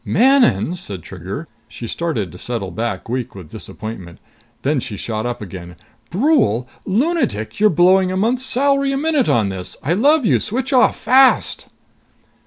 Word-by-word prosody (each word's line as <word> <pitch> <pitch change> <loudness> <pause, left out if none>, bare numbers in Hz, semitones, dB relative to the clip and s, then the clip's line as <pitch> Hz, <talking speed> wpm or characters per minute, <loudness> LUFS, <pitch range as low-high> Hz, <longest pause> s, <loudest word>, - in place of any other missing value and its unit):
"Manon!" 255 - +3
said 100 - -7
Trigger. - - -7 0.2
She 120 - -9
started 115 - -3
to 90 - -12
settle 115 -6 -4
back, 110 -5 -4
weak 125 -2 -4
with 90 -6 -11
disappointment. 95 -6 -8 0.5
Then 145 +1 +1
she 105 -4 -6
shot 110 +3 -3
up 120 -3 -4
again. 90 -2 -9 0.3
"Brule! 185 - +2 0.2
Lunatic! 220 - -1
You're 215 0 +5
blowing 185 +2 +4
a 185 - -2
month's 235 +6 +1
salary 275 +1 +1
a 270 - -1
minute 300 -3 +1
on 110 -4 +2
this! 95 -2 -6
I 155 - +1
love 285 - +3
you! - - +3
Switch 255 +5 -3
off, 255 - +4
fast!" 260 0 +3
170 Hz, 160 wpm, -19 LUFS, -, 0.5 s, You're